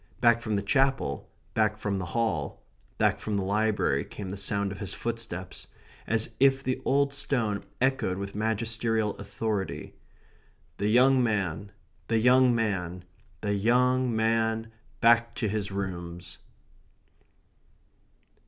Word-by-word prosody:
Back 120 -1 +4
from 110 -2 -1
the 100 - -1
Chapel, 135 - +1 0.2
back 110 -1 +2
from 100 -2 -2
the 90 - -3
Hall, 100 -7 -2 0.3
back - - +2
from 105 - -3
the 100 - 0
Library, 105 +2 +1
came 95 -3 -7
the - - -4
sound 100 0 0
of 95 - -7
his 100 - -4
footsteps, 115 -6 -4 0.4
as 115 +1 0
if 135 0 +4
the 130 0 -2
old 140 0 +2
stone 125 -8 -1 0.2
echoed 130 -8 +1
with 100 0 -5
magisterial 110 0 0
authority: 100 0 -3 0.8
"The 100 - 0
young 130 +4 +5
man 100 -4 -1 0.4
the 115 - +2
young 125 +2 +5
man 90 -5 -2 0.4
the 105 -1 0
young 125 +3 +2
man 110 0 +1 0.3
back 115 0 +4
to 110 - -1
his 105 -1 -2
rooms." 90 -3 -5
110 Hz, 130 wpm, -28 LUFS, 100-120 Hz, 0.8 s, young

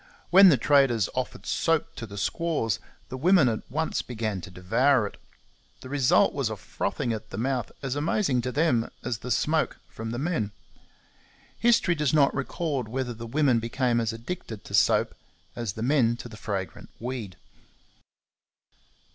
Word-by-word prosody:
When 190 +1 +9
the 145 - +5
traders 130 -5 +3
offered 130 -1 -4
soap 165 -2 0
to 115 - -6
the 100 0 -9
squaws, 150 - -1 0.3
the 130 - -5
women 170 0 +5
at 110 -2 -2
once 160 +5 -1
began 110 -5 -3
to 95 - -9
devour 110 +8 +2
it. 100 - -7 0.6
The 130 - -9
result 140 -3 +3
was - - -1
a - - -3
frothing 120 - -3
at 110 - -7
the - - -7
mouth 125 +2 -1
as 135 -1 -2
amazing 145 - +1
to 125 +1 -3
them 125 -6 +1
as 120 -3 -3
the 125 - -7
smoke 155 +6 +1
from 115 +1 -7
the 120 - -3
men. 125 - -1 1.1
History 230 -6 +4
does 150 -2 +1
not 140 -2 +4
record 140 -2 -2
whether 125 +1 -3
the 115 +1 -8
women 130 -1 +2
became 120 +1 0
as 115 0 -1
addicted 115 - -7
to - - -11
soap - - +3 0.4
as 115 -4 -3
the 110 - -5
men 120 -3 +3
to 120 - -8
the 115 - -11
fragrant 100 -3 -5
weed. 115 -6 -5
125 Hz, 165 wpm, -26 LUFS, 115-145 Hz, 1.1 s, When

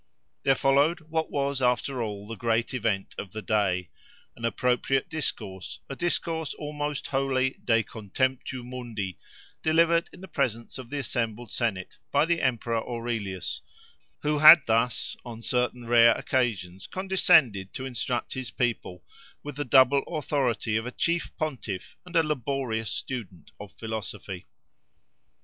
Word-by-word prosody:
There 135 -1 +4
followed 140 +6 +3
what 160 0 0
was, 140 -1 -1
after 125 +1 +1
all, 105 -2 -4
the 115 - -5
great 115 +3 0
event 110 -6 -1
of 95 - -7
the 110 - -4
day:—an 100 +2 -3
appropriate 125 +5 +1
discourse, 95 - -4
a - - -3
discourse 165 -1 -1
almost 150 -1 -4
wholly 135 -1 0
de 115 -1 +3
contemptu 130 +5 -2
mundi, 115 - -5 0.4
delivered 165 +1 +3
in 180 - -14
the 190 - -8
presence 120 - -2
of 125 -2 -9
the 145 - -3
assembled 120 -4 -2
Senate, 100 -6 -2
by 145 +2 +4
the 170 0 +1
emperor 115 -2 0
Aurelius, 115 -6 -3 0.6
who 150 0 +1
had 155 +1 +11
thus, 125 +7 +1
on 115 -2 -9
certain 125 -1 0
rare 115 0 +6
occasions, 100 -7 -1
condescended 155 - +3
to 130 - -4
instruct 125 -1 -2
his 130 -2 -4
people, 115 -7 -2 0.4
with 145 -2 -6
the 145 - -2
double 130 +2 +6
authority 130 -8 0
of 110 +2 -3
a - - -4
chief 170 +5 0
pontiff 125 -11 -4
and 180 - -10
a 165 - +6
laborious 130 -6 -2
student 110 -9 -5
of 100 -1 -9
philosophy. 105 -4 -6
125 Hz, 140 wpm, -27 LUFS, 110-145 Hz, 0.6 s, had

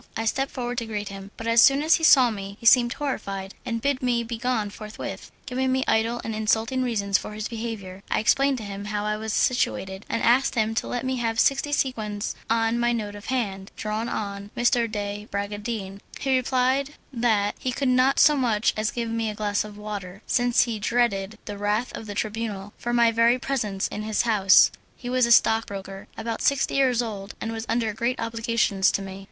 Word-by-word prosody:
I 225 - -2
stepped 270 +5 0
forward 245 -2 -3
to 230 - -6
greet 210 -2 -4
him, 195 0 -9
but 225 - -7
as 230 0 +5
soon 275 +3 +5
as 315 - +5
he 325 - -8
saw 260 -6 +7
me 200 -1 -7
he - - -12
seemed 240 0 +6
horrified 200 -9 -4
and 230 -1 -3
bid 280 -1 +1
me 245 -2 +1
be 230 0 -5
gone 230 -4 -1
forthwith, 215 +1 -7 0.2
giving 260 0 -1
me 260 0 +1
idle 225 +2 +1
and 225 - -4
insulting 220 +4 0
reasons 205 -5 +1
for - - -8
his 215 0 -4
behaviour. 220 -5 -6
I - - +1
explained 270 +5 +3
to 225 - -6
him 200 0 -6
how 205 0 -2
I 210 0 0
was 220 +1 -4
situated, 190 -5 0
and - - -1
asked 255 +4 +3
him 220 -1 +1
to 225 - -2
let 245 +1 -3
me 260 0 -1
have 225 -2 -1
sixty 275 +1 +2
sequins 220 -7 -1 0.2
on 225 +1 +1
my 240 0 +2
note 210 -3 -3
of 205 0 -10
hand, 200 -6 -2
drawn 215 +2 -3
on 200 -2 -4
M. 240 - -1 0.3
de 205 0 -4
Bragadin. 200 0 -4 0.2
He 270 -1 +1
replied 260 +3 +1 0.2
that 220 -4 +1
he 255 - -2
could 270 +2 -1
not 255 +2 +3
so 300 - +6
much 235 -5 +1
as 215 0 0
give 235 -1 -3
me 225 -1 -1
a 210 - -5
glass 205 -1 0
of 210 -1 -10
water, 205 -2 -7
since 245 -1 +3
he 230 -3 -3
dreaded 220 -2 0
the 205 -1 -6
wrath 210 +4 -1
of 225 - -8
the 205 - -6
Tribunal 210 -2 -4
for 240 - -4
my 235 -1 +4
very 230 +2 +4
presence 220 -8 -2
in 210 - -5
his 215 0 0
house. 205 -5 +5 0.2
He 245 -1 -6
was 255 -1 +3
a - - 0
stockbroker, 200 -4 +2
about 225 0 -4
sixty 280 -1 +1
years 255 -3 +3
old, 200 -3 -6
and 225 - -4
was 225 0 -5
under 225 -1 0
great 235 +4 -1
obligations 230 -4 +1
to 195 - -1
me. 190 0 -8
225 Hz, 210 wpm, -25 LUFS, 205-245 Hz, 0.3 s, saw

